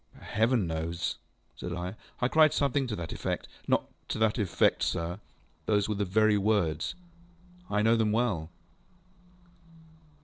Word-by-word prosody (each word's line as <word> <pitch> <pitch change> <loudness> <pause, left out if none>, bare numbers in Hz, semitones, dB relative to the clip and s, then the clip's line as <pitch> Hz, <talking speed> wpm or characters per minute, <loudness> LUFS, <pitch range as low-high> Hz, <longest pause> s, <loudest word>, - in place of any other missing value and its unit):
ŌĆØ - - -15
ŌĆ£Heaven 110 -1 +2
knows, 80 +1 -3
ŌĆØ - - +1 0.5
said 90 - -4
I. 90 +1 -4 0.3
ŌĆ£I 125 - 0
cried 155 -1 +6
something 140 -1 +1
to 110 - -2
that 85 -3 -5
effectŌĆöŌĆØ - - -2 0.3
ŌĆ£Not - - +3 0.2
to - - -3
that 110 +1 +2
effect, 100 -5 +2
sir. 85 +3 -1 0.5
Those 105 -2 +2
were 110 - 0
the 100 0 -1
very 105 +2 +3
words. 95 -7 +1 0.7
I 105 0 +1
know 115 +1 +5
them 110 -2 +2
well. 105 -9 0
105 Hz, 150 wpm, -29 LUFS, 85-110 Hz, 0.7 s, cried